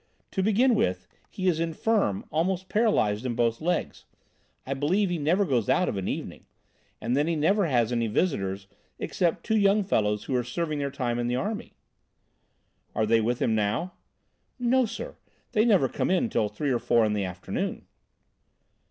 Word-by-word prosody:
To 190 Hz, -, -1 dB
begin 220 Hz, +6 st, +3 dB
with, 90 Hz, -, 0 dB, 0.2 s
he 190 Hz, -1 st, -3 dB
is 165 Hz, -3 st, +2 dB
infirm, 165 Hz, -, 0 dB
almost 185 Hz, +4 st, -1 dB
paralysed 130 Hz, -, +2 dB
in 125 Hz, -2 st, -2 dB
both 115 Hz, -1 st, 0 dB
legs. 175 Hz, +3 st, -2 dB, 0.6 s
I 135 Hz, -, -2 dB
believe 175 Hz, +8 st, +1 dB
he 175 Hz, -, -1 dB
never 175 Hz, +7 st, +2 dB
goes 125 Hz, -, 0 dB
out 180 Hz, +8 st, +3 dB
of -, -, -2 dB
an 95 Hz, -1 st, -3 dB
evening. -, -, -5 dB, 0.5 s
And 120 Hz, +2 st, -1 dB
then 145 Hz, +3 st, +2 dB
he 170 Hz, -, +1 dB
never 185 Hz, +5 st, +2 dB
has 120 Hz, -5 st, +1 dB
any 115 Hz, -1 st, 0 dB
visitors 100 Hz, -, -1 dB, 0.3 s
except 170 Hz, -3 st, -1 dB
two 220 Hz, -, 0 dB
young 205 Hz, 0 st, +4 dB
fellows 105 Hz, -, 0 dB
who 135 Hz, -, -2 dB
are 125 Hz, -, +1 dB
serving 155 Hz, +5 st, -3 dB
their 140 Hz, -1 st, -1 dB
time 125 Hz, -3 st, -2 dB
in 120 Hz, -, -1 dB
the 120 Hz, -, 0 dB
army." 205 Hz, -, -3 dB, 1.2 s
"Are 110 Hz, -, +2 dB
they 115 Hz, +1 st, +3 dB
with 120 Hz, +2 st, 0 dB
him 115 Hz, -, +2 dB
now?" 110 Hz, -, -1 dB, 0.6 s
"No, 250 Hz, 0 st, +2 dB
sir, 225 Hz, -, -7 dB, 0.3 s
they 215 Hz, -2 st, +3 dB
never 195 Hz, -, +4 dB
come 190 Hz, -, 0 dB
till 110 Hz, -, 0 dB
three 135 Hz, +7 st, -2 dB
or 120 Hz, -, +1 dB
four 115 Hz, -1 st, +3 dB
in 105 Hz, -, 0 dB
the 105 Hz, -1 st, -1 dB
afternoon." 90 Hz, -1 st, -4 dB
145 Hz, 180 wpm, -27 LUFS, 115-190 Hz, 1.2 s, young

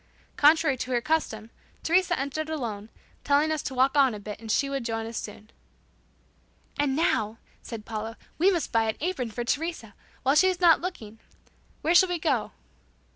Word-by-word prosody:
Contrary 305 Hz, -1 st, +4 dB
to 250 Hz, -, -5 dB
her 245 Hz, -2 st, +2 dB
custom 235 Hz, -6 st, -2 dB, 0.3 s
Teresa 355 Hz, +1 st, +2 dB
entered 280 Hz, +3 st, -3 dB
alone, 225 Hz, -9 st, -4 dB, 0.3 s
telling 290 Hz, +2 st, +3 dB
us 310 Hz, -2 st, -1 dB
to 265 Hz, -, -5 dB
walk 265 Hz, +3 st, +3 dB
on 270 Hz, -5 st, +4 dB
a -, -, -7 dB
bit 210 Hz, +1 st, -8 dB
and 220 Hz, -1 st, -4 dB
she 275 Hz, -, +2 dB
would 275 Hz, -2 st, -3 dB
join 225 Hz, -1 st, -3 dB
us 230 Hz, +1 st, -7 dB
soon. 215 Hz, 0 st, -7 dB, 1.3 s
"And 280 Hz, -2 st, +1 dB
now," 225 Hz, -9 st, +1 dB, 0.2 s
said 225 Hz, -3 st, -8 dB
Paula, 220 Hz, 0 st, -5 dB, 0.2 s
"we 365 Hz, +4 st, +5 dB
must 345 Hz, -7 st, -1 dB
buy 225 Hz, -1 st, +2 dB
an 220 Hz, -, -3 dB
apron 305 Hz, -7 st, -2 dB
for 240 Hz, +2 st, -4 dB
Teresa, 285 Hz, -5 st, -3 dB, 0.3 s
while 265 Hz, +1 st, +3 dB
she's 370 Hz, +4 st, +3 dB
not 340 Hz, -3 st, +5 dB
looking. 225 Hz, -, -6 dB, 0.6 s
Where 325 Hz, -, +2 dB
shall 365 Hz, +1 st, +6 dB
we 355 Hz, -, 0 dB
go?" 290 Hz, -8 st, 0 dB
270 Hz, 180 wpm, -27 LUFS, 225-320 Hz, 1.3 s, shall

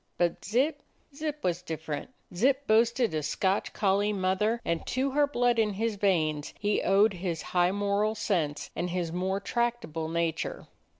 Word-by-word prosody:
But 175 Hz, -1 st, 0 dB
Zip 255 Hz, -, +1 dB, 0.2 s
— 280 Hz, -, -29 dB
Zip 305 Hz, 0 st, -4 dB
was 180 Hz, -1 st, 0 dB
different. 160 Hz, -2 st, -5 dB, 0.2 s
Zip 265 Hz, +9 st, +2 dB
boasted 230 Hz, -1 st, +3 dB
a 155 Hz, -, 0 dB
Scotch 190 Hz, +6 st, 0 dB
collie 205 Hz, +1 st, +1 dB
mother, 195 Hz, +4 st, +1 dB
and 170 Hz, -1 st, -1 dB
to 265 Hz, +2 st, 0 dB
her 290 Hz, +1 st, +3 dB
blood 245 Hz, -4 st, +2 dB
in 210 Hz, -2 st, +2 dB
his 220 Hz, +2 st, -1 dB
veins 160 Hz, -7 st, 0 dB
he 205 Hz, 0 st, +1 dB
owed 200 Hz, +2 st, +4 dB
his 175 Hz, -3 st, -3 dB
high 175 Hz, 0 st, +4 dB
moral 205 Hz, +2 st, 0 dB
sense 170 Hz, -9 st, -1 dB
and 180 Hz, -, -2 dB
his 175 Hz, -2 st, -2 dB
more 190 Hz, +3 st, -1 dB
tractable 230 Hz, -8 st, -2 dB
nature. 165 Hz, -1 st, -2 dB
200 Hz, 165 wpm, -28 LUFS, 175-230 Hz, 0.2 s, owed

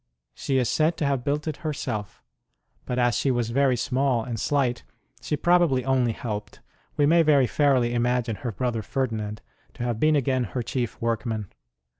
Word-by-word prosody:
She 135 Hz, -, -1 dB
is 125 Hz, -2 st, +2 dB
said 160 Hz, +2 st, +1 dB
to 150 Hz, -, -1 dB
have 135 Hz, -3 st, 0 dB
built 150 Hz, +3 st, -1 dB
it 155 Hz, -, -3 dB
herself, 120 Hz, -9 st, -4 dB, 0.6 s
but 125 Hz, -, -2 dB
as 120 Hz, -1 st, +2 dB
she 140 Hz, -, +1 dB
was 120 Hz, -3 st, 0 dB
very 135 Hz, 0 st, +2 dB
small 130 Hz, -2 st, +1 dB
and 115 Hz, -2 st, -4 dB
slight, 130 Hz, -1 st, 0 dB, 0.4 s
she 150 Hz, -, -2 dB
probably 170 Hz, -6 st, +3 dB
only 130 Hz, -3 st, +2 dB
helped: 105 Hz, -2 st, -6 dB, 0.4 s
we 145 Hz, -, +4 dB
may 165 Hz, +3 st, +5 dB
very 145 Hz, -4 st, +4 dB
fairly 125 Hz, -2 st, +2 dB
imagine 120 Hz, -2 st, 0 dB
her 120 Hz, -, -4 dB
brother 115 Hz, +2 st, -2 dB
Ferdinand 110 Hz, -3 st, -3 dB, 0.3 s
to 120 Hz, -, -5 dB
have 120 Hz, -2 st, -2 dB
been 155 Hz, +3 st, +4 dB
again 130 Hz, -3 st, +1 dB
her 120 Hz, +3 st, -4 dB
chief 120 Hz, -1 st, -3 dB
workman. 110 Hz, -3 st, -2 dB
125 Hz, 175 wpm, -25 LUFS, 115-140 Hz, 0.6 s, may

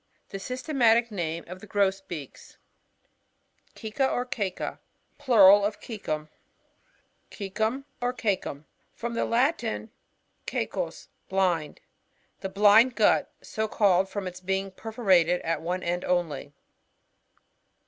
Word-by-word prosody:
The 195 Hz, -, -6 dB
systematic 240 Hz, -1 st, +2 dB
name 170 Hz, -4 st, -3 dB
of 180 Hz, +2 st, -9 dB
the 215 Hz, -, -12 dB
Grosbeaks. 190 Hz, -7 st, -3 dB, 1.2 s
Cceca, 225 Hz, +5 st, -1 dB
or 245 Hz, -, -1 dB
CiECA. 205 Hz, -7 st, -3 dB, 0.2 s
— -, -, -43 dB
Plural 205 Hz, -8 st, +7 dB
of 205 Hz, +1 st, -1 dB
Coecum. 155 Hz, -9 st, -4 dB, 1.0 s
C<ECuii, 220 Hz, +6 st, -2 dB, 0.2 s
or 245 Hz, 0 st, +1 dB
CiCcuM. 195 Hz, -, -2 dB, 0.2 s
— -, -, -42 dB
From 235 Hz, +1 st, -4 dB
the 230 Hz, -, 0 dB
Latin, 235 Hz, -3 st, 0 dB, 0.6 s
c<Mu«, -, -, -2 dB, 0.4 s
blind. 180 Hz, -5 st, 0 dB, 0.6 s
The 195 Hz, -, -4 dB
blind 210 Hz, +5 st, +5 dB
gut\ 215 Hz, -, +3 dB
so 220 Hz, 0 st, -2 dB
called 195 Hz, -3 st, +3 dB
from 200 Hz, -1 st, -4 dB
its 180 Hz, 0 st, -6 dB
being 190 Hz, +1 st, -2 dB
perforated 185 Hz, -5 st, +2 dB
at 165 Hz, 0 st, -1 dB
one 180 Hz, +2 st, -3 dB
end 175 Hz, +1 st, -1 dB
only. 165 Hz, -6 st, -1 dB
200 Hz, 115 wpm, -27 LUFS, 180-230 Hz, 1.2 s, Plural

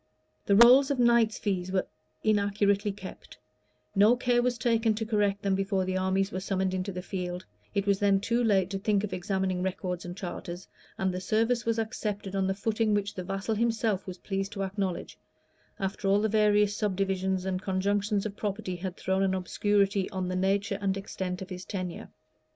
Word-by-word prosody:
The 200 Hz, -, +5 dB
rolls 250 Hz, +5 st, +8 dB
of 280 Hz, -, 0 dB
knights' 235 Hz, -3 st, +4 dB
fees 185 Hz, -3 st, -2 dB
were 190 Hz, -1 st, +1 dB, 0.4 s
inaccurately 205 Hz, -1 st, +2 dB
kept; 195 Hz, -1 st, -10 dB, 0.6 s
no 210 Hz, +5 st, +6 dB
care 245 Hz, 0 st, +2 dB
was 245 Hz, -1 st, 0 dB
taken 225 Hz, -1 st, +2 dB
to 220 Hz, +1 st, -3 dB
correct 205 Hz, -2 st, 0 dB
them 195 Hz, -1 st, +1 dB
before 195 Hz, 0 st, 0 dB
the 185 Hz, 0 st, -2 dB
armies 190 Hz, +1 st, +1 dB
were 185 Hz, -, -3 dB
summoned 190 Hz, -1 st, -1 dB
into 185 Hz, +1 st, -2 dB
the 180 Hz, -1 st, -6 dB
field,[*] 180 Hz, -2 st, -4 dB, 0.3 s
it 200 Hz, 0 st, +1 dB
was 200 Hz, -1 st, +2 dB
then 200 Hz, -1 st, +3 dB
too 235 Hz, +4 st, 0 dB
late 195 Hz, -4 st, +2 dB
to 195 Hz, -, -2 dB
think 205 Hz, 0 st, +1 dB
of 200 Hz, -3 st, -3 dB
examining 185 Hz, 0 st, -1 dB
records 180 Hz, -1 st, -3 dB
and 175 Hz, +1 st, -7 dB
charters; 175 Hz, -1 st, -6 dB, 0.3 s
and 190 Hz, -1 st, 0 dB
the 180 Hz, -, -4 dB
service 230 Hz, +4 st, +1 dB
was 230 Hz, 0 st, +1 dB
accepted 210 Hz, -3 st, -3 dB
on 190 Hz, -1 st, +1 dB
the 190 Hz, -, 0 dB
footing 215 Hz, +1 st, +1 dB
which 205 Hz, 0 st, -1 dB
the 185 Hz, -, -5 dB
vassal 195 Hz, +4 st, -2 dB
himself 225 Hz, -3 st, 0 dB
was 185 Hz, 0 st, -6 dB
pleased 195 Hz, +1 st, -3 dB
to 195 Hz, -, -3 dB
acknowledge, 190 Hz, -2 st, -3 dB, 0.6 s
after 195 Hz, +1 st, -3 dB
all 200 Hz, +1 st, +4 dB
the 215 Hz, -, +2 dB
various 210 Hz, -1 st, +3 dB
subdivisions 190 Hz, -2 st, -1 dB
and 185 Hz, -1 st, -2 dB
conjunctions 200 Hz, +2 st, 0 dB
of 205 Hz, -2 st, -4 dB
property 200 Hz, -3 st, -3 dB
had 180 Hz, 0 st, -5 dB
thrown 190 Hz, +1 st, 0 dB
an 190 Hz, -1 st, +2 dB
obscurity 200 Hz, +1 st, +1 dB
on 185 Hz, -1 st, -3 dB
the 185 Hz, -, -2 dB
nature 195 Hz, +2 st, 0 dB
and 195 Hz, -1 st, 0 dB
extent 190 Hz, -2 st, -4 dB
of 190 Hz, -, -12 dB
his 180 Hz, 0 st, -6 dB
tenure. 185 Hz, -4 st, -5 dB
195 Hz, 190 wpm, -28 LUFS, 190-210 Hz, 0.6 s, rolls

